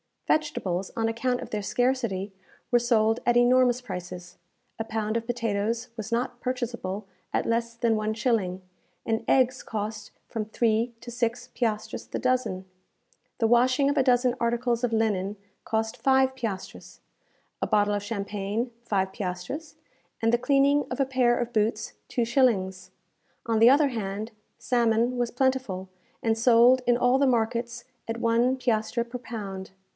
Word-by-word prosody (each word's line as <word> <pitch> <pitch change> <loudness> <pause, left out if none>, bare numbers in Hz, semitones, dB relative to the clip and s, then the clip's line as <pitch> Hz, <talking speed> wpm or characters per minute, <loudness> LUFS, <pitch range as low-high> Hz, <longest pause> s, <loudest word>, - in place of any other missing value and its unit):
Vegetables, 195 - 0
on 225 -1 0
account 245 +2 -1
of - - -7
their 210 - -2
scarcity, 230 -4 0 0.4
were 240 - +5
sold 225 -1 +2
at 240 - +3
enormous 250 0 +4
prices. 180 -5 -7 0.4
A - - 0
pound 220 0 -1
of 230 0 -5
potatoes 230 -1 -1
was 220 - -5
not 240 +1 -2
purchaseable 235 -6 -3 0.3
at - - +1
less 230 0 -1
than 230 -1 +1
one 215 0 -1
shilling, 215 -5 0 0.4
and 225 0 -1
eggs 260 -1 +3
cost 210 -1 -5 0.2
from 220 -2 -3
three 225 +2 +1
to 240 - -8
six 240 +1 -2
piastres 215 -3 -2
the - - -4
dozen. 250 -8 0 0.7
The 225 - +2
washing 255 +4 +4
of 290 - -3
a 270 - +4
dozen 250 -1 +3
articles 235 0 0
of 235 - -3
linen 210 -3 0 0.3
cost 220 +2 -1
five 265 +2 +3
piastres; 225 -7 -6 0.6
a - - 0
bottle 205 -1 +2
of 205 - -1
champagne, 205 +2 -3
five 190 -4 0
piastres; 190 - -5 0.4
and 225 0 +2
the - - +5
cleaning 280 +3 +3
of 250 - -4
a 275 - +3
pair 255 -2 +2
of 240 0 -3
boots, 215 +1 0
two 240 -3 0
shillings. 220 -8 +1 0.6
On 225 -1 +1
the 230 +2 +8
other 285 +2 +5
hand, 215 -1 -4 0.3
salmon 235 0 +1
was 240 -1 0
plentiful, 250 -8 -1 0.3
and 225 -1 +2
sold 240 +2 +6
in 240 -1 +4
all 245 +2 +3
the 280 - +4
markets 235 0 0 0.2
at 225 0 -3
one 235 +3 +3
piastre 235 -1 0
per 245 +1 -7
pound. 200 -6 -7
235 Hz, 155 wpm, -26 LUFS, 215-250 Hz, 0.7 s, the